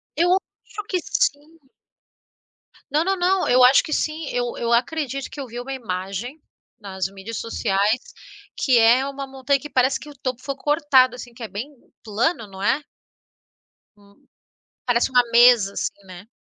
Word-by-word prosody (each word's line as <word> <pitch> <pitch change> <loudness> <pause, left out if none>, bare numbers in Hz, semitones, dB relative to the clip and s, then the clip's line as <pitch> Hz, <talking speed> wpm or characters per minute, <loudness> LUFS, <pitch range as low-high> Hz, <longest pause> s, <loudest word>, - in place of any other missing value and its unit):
Eu 345 +3 +2
acho 420 +2 -7
que 370 - +1
sim. 330 -9 -2 1.3
Não, 310 +4 +1
não, 385 0 +1
não, 370 +1 +1
eu 250 0 +5
acho 260 +2 +7
que 310 - -4
sim. 310 -1 -2
Eu 245 -1 -2
eu 235 0 0
acredito 275 +1 -1
que 290 - -9
eu 265 - -5
vi 240 +1 -7
uma 270 +2 -8
imagem 215 - -5 0.4
nas 190 -2 -5
mídias 195 +3 -8
sociais, 210 0 0 0.6
que 255 -3 +3
é 235 +4 +5
uma 275 0 -6
montanha 270 +1 -1
que 295 - -9
parece 260 +1 +2
que 300 - -11
o 290 - -13
topo 255 -1 -4
foi 275 -1 -4
cortado, 280 -5 +3
assim, 245 -1 -10
que 235 - -16
é - - -4
bem 225 +9 -6 0.3
plano, 230 +3 -1
não 190 0 -11
é? 275 +8 +1 1.1
Hum. 200 0 -24 0.6
Parece 245 0 +2
uma 250 -1 +5
mesa 235 -4 +6
assim, - - -3
né? 185 +3 -12
255 Hz, 170 wpm, -22 LUFS, 225-290 Hz, 1.3 s, acho